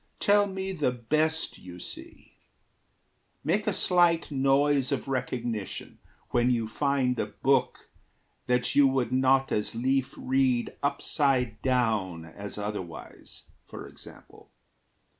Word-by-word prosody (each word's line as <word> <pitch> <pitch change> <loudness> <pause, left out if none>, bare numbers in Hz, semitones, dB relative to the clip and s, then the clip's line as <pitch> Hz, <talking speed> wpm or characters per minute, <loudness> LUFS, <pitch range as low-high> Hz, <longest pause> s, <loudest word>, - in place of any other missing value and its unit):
Tell 205 0 +4
me 190 0 -4
the 155 -8 0
best 155 +7 -1
you 90 -1 -11
see. - - -11 1.1
Make - - 0
a - - +3
slight 175 -3 +3
noise 140 0 +2
Of 140 - -2
recognition 120 -5 -4 0.3
when 120 0 +2
you 115 -3 0
find 130 0 0
a - - -1
book - - 0 0.6
That 125 -1 +1
you 145 -1 +6
would 130 -3 0
not 130 +1 +3
as 105 +1 -1
lief 130 +2 0
read 130 -2 +1
upside 130 -5 0
down 110 -10 0
As 100 +6 -7
otherwise, 105 -5 -7 0.2
for - - -9
example. - - -14
130 Hz, 120 wpm, -27 LUFS, 115-140 Hz, 1.1 s, you